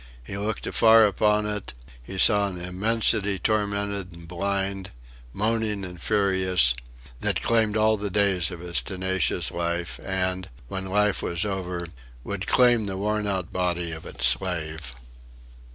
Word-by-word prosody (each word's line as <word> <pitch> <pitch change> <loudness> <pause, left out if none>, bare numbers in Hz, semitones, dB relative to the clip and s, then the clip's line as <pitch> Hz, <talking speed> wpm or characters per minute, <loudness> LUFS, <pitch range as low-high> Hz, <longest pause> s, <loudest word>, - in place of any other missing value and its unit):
He 65 - -7
looked 105 +2 -3
afar 110 -1 +6
upon 105 +1 +2
it, 105 -10 -4 0.3
and - - -8
he - - -5
saw 100 +1 +5
an 90 -2 -6
immensity 100 +2 +1
tormented 100 -1 -1
and 85 0 -13
blind, 95 +1 -2 0.4
moaning 105 - -1
and 90 -1 -10
furious, 95 - +2 0.5
that - - 0
claimed 110 -2 +2
all 110 0 +3
the 105 0 -3
days 95 -4 +2
of 85 -2 -8
his 85 -6 +1
tenacious 95 0 0
life, 85 0 -3
and, 95 -1 -2 0.2
when 95 +5 -4
life 105 +1 +1
was 85 +3 -1
over, 90 -3 -3 0.4
would 100 -1 -5
claim 120 -3 +4
the 95 -1 -4
worn 105 +1 -1
out 95 -3 -2
body 90 -2 -1
of 80 -1 -7
its 65 - -2
slave.... 80 +1 0
95 Hz, 150 wpm, -25 LUFS, 90-105 Hz, 0.5 s, afar